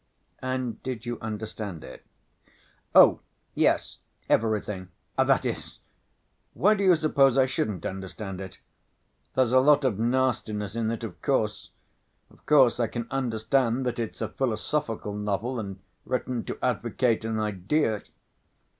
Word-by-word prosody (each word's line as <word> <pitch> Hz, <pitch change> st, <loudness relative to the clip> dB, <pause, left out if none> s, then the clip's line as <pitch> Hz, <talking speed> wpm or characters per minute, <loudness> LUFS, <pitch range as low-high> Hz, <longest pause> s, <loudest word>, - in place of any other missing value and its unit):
"And 130 Hz, -2 st, -3 dB
did 125 Hz, -2 st, -5 dB
you 120 Hz, -1 st, -4 dB
understand 110 Hz, -5 st, -5 dB
it?" -, -, -11 dB, 0.9 s
"Oh, -, -, +8 dB, 0.3 s
yes, -, -, +1 dB, 0.3 s
everything.... 105 Hz, -4 st, 0 dB, 0.3 s
That -, -, +3 dB
is... -, -, -4 dB, 0.8 s
Why 205 Hz, +5 st, +4 dB
do 200 Hz, -2 st, -1 dB
you 185 Hz, -2 st, +6 dB
suppose 140 Hz, -4 st, +3 dB
I 135 Hz, -, +6 dB
shouldn't 105 Hz, -8 st, -2 dB
understand 95 Hz, 0 st, -5 dB
it? 95 Hz, -3 st, -8 dB, 0.8 s
There's 130 Hz, -3 st, +3 dB
a 130 Hz, -, +7 dB
lot 145 Hz, +1 st, +5 dB
of 110 Hz, -6 st, +1 dB
nastiness 115 Hz, -4 st, 0 dB
in 115 Hz, -1 st, 0 dB
it, 115 Hz, -1 st, -3 dB
of -, -, -7 dB
course.... -, -, 0 dB, 0.6 s
Of -, -, -22 dB
course 135 Hz, -5 st, +5 dB
I 120 Hz, -, +2 dB
can 120 Hz, +1 st, -4 dB
understand 125 Hz, 0 st, 0 dB
that 120 Hz, 0 st, -2 dB
it's 115 Hz, -2 st, -4 dB
a -, -, 0 dB
philosophical 115 Hz, -3 st, -2 dB
novel 105 Hz, +4 st, -2 dB
and 100 Hz, -3 st, -5 dB, 0.3 s
written 125 Hz, -2 st, -2 dB
to -, -, -5 dB
advocate 115 Hz, -4 st, +1 dB
an 110 Hz, -1 st, -2 dB
idea...." 105 Hz, -, 0 dB
115 Hz, 135 wpm, -27 LUFS, 105-130 Hz, 0.9 s, Oh